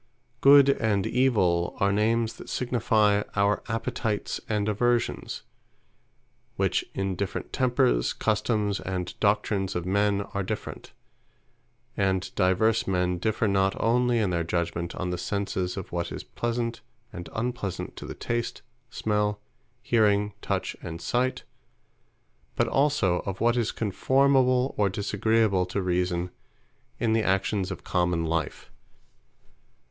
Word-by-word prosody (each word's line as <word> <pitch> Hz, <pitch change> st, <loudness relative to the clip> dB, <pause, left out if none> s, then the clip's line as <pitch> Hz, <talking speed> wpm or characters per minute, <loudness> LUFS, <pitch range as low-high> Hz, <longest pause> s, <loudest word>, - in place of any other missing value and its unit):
Good, 140 Hz, 0 st, +8 dB
and 110 Hz, -7 st, +1 dB
Evill, 100 Hz, -10 st, +2 dB
are 100 Hz, 0 st, +3 dB
names 110 Hz, +2 st, +1 dB
that -, -, -10 dB
signifie 110 Hz, -4 st, +2 dB
our 100 Hz, 0 st, +2 dB
Appetites, 115 Hz, -2 st, -2 dB
and 105 Hz, -1 st, 0 dB
Aversions; 120 Hz, +3 st, 0 dB, 1.1 s
which -, -, +1 dB
in 95 Hz, -1 st, -1 dB
different 100 Hz, +2 st, -4 dB
tempers, 120 Hz, -, +2 dB
customes, 105 Hz, -1 st, 0 dB
and 90 Hz, -1 st, -4 dB
doctrines 100 Hz, -2 st, +1 dB
of 90 Hz, -1 st, -2 dB
men, 100 Hz, +1 st, +2 dB
are 100 Hz, -, -1 dB
different: 105 Hz, +2 st, -6 dB, 1.0 s
And 95 Hz, -2 st, 0 dB
divers 100 Hz, +4 st, +2 dB
men, 90 Hz, -2 st, 0 dB
differ 110 Hz, +3 st, 0 dB
not 95 Hz, -1 st, +1 dB
onely 120 Hz, +1 st, +2 dB
in 105 Hz, -5 st, +1 dB
their 85 Hz, -1 st, 0 dB
Judgement, 85 Hz, 0 st, -2 dB
on 90 Hz, -1 st, -3 dB
the 90 Hz, -, -3 dB
senses 100 Hz, -3 st, -2 dB
of 95 Hz, -, -6 dB
what 85 Hz, -1 st, -3 dB
is -, -, -6 dB
pleasant, 120 Hz, 0 st, -3 dB, 0.3 s
and 85 Hz, -4 st, -7 dB
unpleasant 110 Hz, -5 st, -3 dB
to -, -, -7 dB
the -, -, -6 dB
tast, 120 Hz, 0 st, -3 dB, 0.3 s
smell, 105 Hz, -2 st, -1 dB, 0.4 s
hearing, 105 Hz, -3 st, +2 dB
touch, -, -, -2 dB
and 80 Hz, 0 st, -6 dB
sight; 125 Hz, +6 st, -1 dB, 1.1 s
but -, -, +2 dB
also 135 Hz, -11 st, +2 dB
of 95 Hz, -1 st, -3 dB
what 120 Hz, +1 st, +3 dB
is 120 Hz, -3 st, 0 dB
conformable, 130 Hz, +4 st, +2 dB
or 100 Hz, -1 st, +3 dB
disagreeable 100 Hz, -1 st, +1 dB
to 95 Hz, -, -2 dB
Reason, 90 Hz, -1 st, -1 dB, 0.7 s
in 115 Hz, -2 st, +1 dB
the 115 Hz, -, +3 dB
actions 95 Hz, -1 st, 0 dB
of 90 Hz, -, -6 dB
common 90 Hz, -2 st, 0 dB
life. 80 Hz, -1 st, -3 dB
105 Hz, 130 wpm, -26 LUFS, 90-115 Hz, 1.1 s, Good